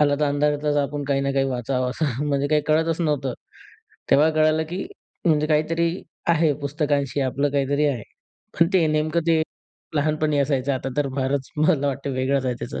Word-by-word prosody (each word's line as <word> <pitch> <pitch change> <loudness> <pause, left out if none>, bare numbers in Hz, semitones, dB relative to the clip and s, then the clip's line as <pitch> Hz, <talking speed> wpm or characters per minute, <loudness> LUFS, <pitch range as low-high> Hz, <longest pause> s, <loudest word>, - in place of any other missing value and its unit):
आला 145 -1 +4
तर, - - +4
अंधारातचं 145 0 +1
आपण 145 +1 -3
काही 140 -1 +2
ना 140 0 0
काही 135 0 +2
वाचावं, 125 0 -1
असं 140 -1 -2
म्हणजे 140 0 +1
काही 155 0 +3
कळतच 160 +2 +1
नव्हतं. 145 -6 0 0.8
तेव्हा 155 +3 +5
कळालं, 155 0 +2
की 180 +5 -5 0.4
म्हणजे 155 -3 +3
काहीतरी 165 +2 +1 0.4
आहे 165 -2 +3
पुस्तकांशी 145 -2 -1
आपलं 140 +2 0
काहीतरी 140 +1 +1
आहे. 125 -6 -1 0.6
पण 165 - +6
ते 175 -4 +4
नेमकं 155 +2 +1
ते 160 -1 +3 0.5
लहानपणी 155 0 +1
असायचं 140 -1 +1
आता 130 0 -3
तर 145 -1 +1
फारच 135 0 -1
मला 150 -2 +2
वाटतं 140 0 -2
वेगळंच 130 +1 0
आहे 125 - 0
त्याचं. 130 - -5
145 Hz, 175 wpm, -23 LUFS, 140-155 Hz, 0.8 s, पण